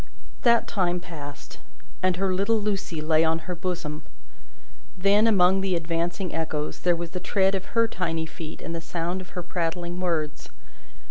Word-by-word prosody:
That 235 Hz, -2 st, +5 dB
time 180 Hz, -3 st, +1 dB
passed, 145 Hz, -5 st, -9 dB, 0.4 s
and 185 Hz, -1 st, +3 dB
her 190 Hz, 0 st, +1 dB
little 200 Hz, +4 st, +2 dB
Lucie 195 Hz, -6 st, -2 dB
lay 155 Hz, +1 st, +4 dB
on 160 Hz, 0 st, +3 dB
her 180 Hz, -, -3 dB
bosom. 170 Hz, -4 st, -3 dB, 1.0 s
Then, 200 Hz, +4 st, +5 dB
among 190 Hz, -3 st, +5 dB
the 190 Hz, -2 st, +1 dB
advancing 170 Hz, +2 st, -1 dB
echoes, 155 Hz, -2 st, -2 dB
there 175 Hz, -1 st, +3 dB
was 170 Hz, 0 st, -5 dB
the 180 Hz, -, -3 dB
tread 195 Hz, +1 st, +2 dB
of 190 Hz, +4 st, -4 dB
her 230 Hz, 0 st, +5 dB
tiny 165 Hz, -6 st, -1 dB
feet 160 Hz, 0 st, -8 dB
and 165 Hz, -, -4 dB
the 165 Hz, -, -3 dB
sound 175 Hz, +2 st, -2 dB
of 185 Hz, -, -12 dB
her 180 Hz, -, -2 dB
prattling 175 Hz, 0 st, -2 dB
words. 165 Hz, -4 st, -1 dB
175 Hz, 165 wpm, -26 LUFS, 165-190 Hz, 1.0 s, That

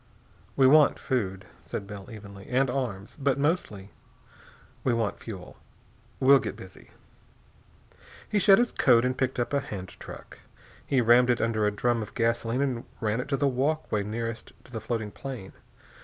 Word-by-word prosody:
"We 135 Hz, -, +4 dB
want 150 Hz, +2 st, +6 dB
food," 100 Hz, -7 st, -2 dB
said 100 Hz, -, -6 dB
Bell 100 Hz, -1 st, -9 dB
evenly, 100 Hz, -3 st, -11 dB
"and 130 Hz, 0 st, +2 dB
arms, 120 Hz, -4 st, -4 dB
but 140 Hz, -1 st, +1 dB
mostly 140 Hz, -, -1 dB, 0.9 s
we 120 Hz, -, +2 dB
want 110 Hz, -3 st, -1 dB
fuel. 95 Hz, -6 st, -9 dB, 0.6 s
We'll 135 Hz, +1 st, +7 dB
get -, -, -5 dB
busy." 95 Hz, 0 st, -13 dB, 1.4 s
He 210 Hz, -, +1 dB
shed 195 Hz, 0 st, +7 dB
his 240 Hz, 0 st, +2 dB
coat 120 Hz, -2 st, +4 dB
and 130 Hz, 0 st, 0 dB
picked 130 Hz, 0 st, -1 dB
up 120 Hz, +3 st, -1 dB
a 140 Hz, -, +3 dB
hand 100 Hz, -9 st, -7 dB
truck. -, -, -11 dB, 0.4 s
He 135 Hz, -2 st, +2 dB
rammed 120 Hz, +2 st, +5 dB
it 120 Hz, -, +3 dB
under 110 Hz, -2 st, +1 dB
a -, -, +1 dB
drum 115 Hz, +3 st, 0 dB
of 110 Hz, -, -8 dB
gasoline 115 Hz, +1 st, 0 dB
and 125 Hz, -4 st, -2 dB, 0.2 s
ran 110 Hz, +1 st, 0 dB
it -, -, -7 dB
to 140 Hz, -1 st, 0 dB
the 140 Hz, -, +2 dB
walkway 135 Hz, -4 st, 0 dB
nearest 115 Hz, +2 st, -5 dB
to -, -, -17 dB
the 110 Hz, -2 st, -5 dB
floating 110 Hz, -1 st, -3 dB
plane. 125 Hz, -8 st, -8 dB
120 Hz, 170 wpm, -27 LUFS, 105-135 Hz, 1.4 s, We'll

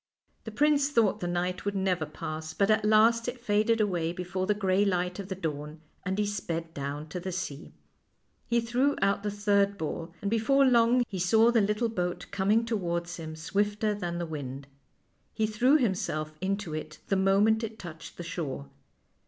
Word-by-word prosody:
The 220 Hz, -, -5 dB
prince 290 Hz, +3 st, +3 dB
thought 230 Hz, -8 st, +2 dB
the 175 Hz, -, -3 dB
night 180 Hz, +1 st, -2 dB
would 205 Hz, 0 st, -2 dB
never 185 Hz, -5 st, 0 dB
pass, 155 Hz, +1 st, -6 dB
but 200 Hz, +1 st, +3 dB
at 215 Hz, 0 st, +3 dB
last 225 Hz, +2 st, +4 dB
it 245 Hz, 0 st, -4 dB
faded 220 Hz, 0 st, +2 dB
aw 210 Hz, -2 st, +2 dB
r 180 Hz, -, 0 dB
ay 165 Hz, +1 st, -1 dB
before 180 Hz, +1 st, -3 dB
the 210 Hz, -, +2 dB
gray 195 Hz, -1 st, +2 dB
light 180 Hz, -1 st, 0 dB
of 195 Hz, -, -5 dB
the 190 Hz, -, -4 dB
dawn, 150 Hz, -3 st, -5 dB, 0.2 s
and 190 Hz, +1 st, -2 dB
he 210 Hz, -, +1 dB
sped 170 Hz, -5 st, -4 dB
down 145 Hz, +1 st, -4 dB
to 180 Hz, -, -4 dB
the 185 Hz, +1 st, -4 dB
sea. 175 Hz, -4 st, -5 dB, 0.7 s
He 235 Hz, 0 st, +2 dB
threw 250 Hz, +5 st, +1 dB
out 200 Hz, 0 st, +2 dB
the 205 Hz, -, -2 dB
third 200 Hz, -1 st, +2 dB
ball, 165 Hz, 0 st, -4 dB
and 200 Hz, -, -2 dB
before 270 Hz, +5 st, +4 dB
long 240 Hz, 0 st, +4 dB
he 190 Hz, -, -5 dB
saw 220 Hz, +6 st, +4 dB
the 235 Hz, -2 st, +4 dB
little 210 Hz, +3 st, +1 dB
boat 180 Hz, -5 st, -3 dB
coming 210 Hz, +4 st, +2 dB
towards 170 Hz, -6 st, -2 dB
him 160 Hz, -2 st, -6 dB
swifter 205 Hz, +6 st, 0 dB
than 175 Hz, -4 st, -3 dB
the 170 Hz, -, -2 dB
wind. 140 Hz, -4 st, -6 dB, 0.7 s
He 220 Hz, -, +1 dB
threw 240 Hz, +7 st, +4 dB
himself 175 Hz, -, -1 dB
into 195 Hz, -3 st, -2 dB
it 155 Hz, 0 st, -6 dB
the 195 Hz, -, +3 dB
mo 195 Hz, +1 st, +3 dB
ment 220 Hz, +2 st, +3 dB
it 220 Hz, 0 st, -5 dB
touched 165 Hz, -4 st, -10 dB
the 175 Hz, -, -5 dB
shore. 145 Hz, -, -5 dB
195 Hz, 195 wpm, -29 LUFS, 170-220 Hz, 0.7 s, last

